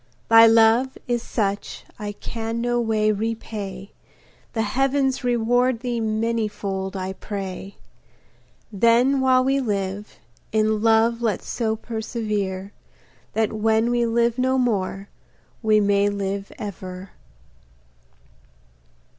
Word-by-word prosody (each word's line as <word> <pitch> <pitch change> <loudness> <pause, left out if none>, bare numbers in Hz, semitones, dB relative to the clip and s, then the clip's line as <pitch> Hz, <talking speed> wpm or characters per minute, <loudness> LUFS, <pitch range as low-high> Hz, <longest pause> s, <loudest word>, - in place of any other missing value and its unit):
Thy 225 0 +9
love 225 +3 +4
is 240 -1 0
such 205 -4 -3
I 205 -1 -4
can 225 +2 -5
no 240 0 0
way 215 -2 +2
repay, 205 -3 -4 0.6
The 225 - 0
heavens 270 +4 0
reward 245 0 +1
thee 245 -2 -2
manifold, 210 -3 -2
I 190 0 -4
pray. 195 -1 -6 1.0
Then 235 +6 +4
while 255 -1 +4
we 270 +1 +2
live, 205 -3 -3 0.3
in 215 0 +1
love 225 +1 +3
let's 220 -4 -1
so 220 -2 -1
perservere 215 -4 -3 0.6
That 220 -1 0
when 220 +2 +2
we 240 -1 +1
live 235 +1 +1
no 260 +1 +2
more, 200 -5 -1 0.5
we 215 -2 +4
may 200 0 +3
live 200 0 -3
ever. 185 -2 -7
220 Hz, 110 wpm, -23 LUFS, 200-235 Hz, 1.0 s, Thy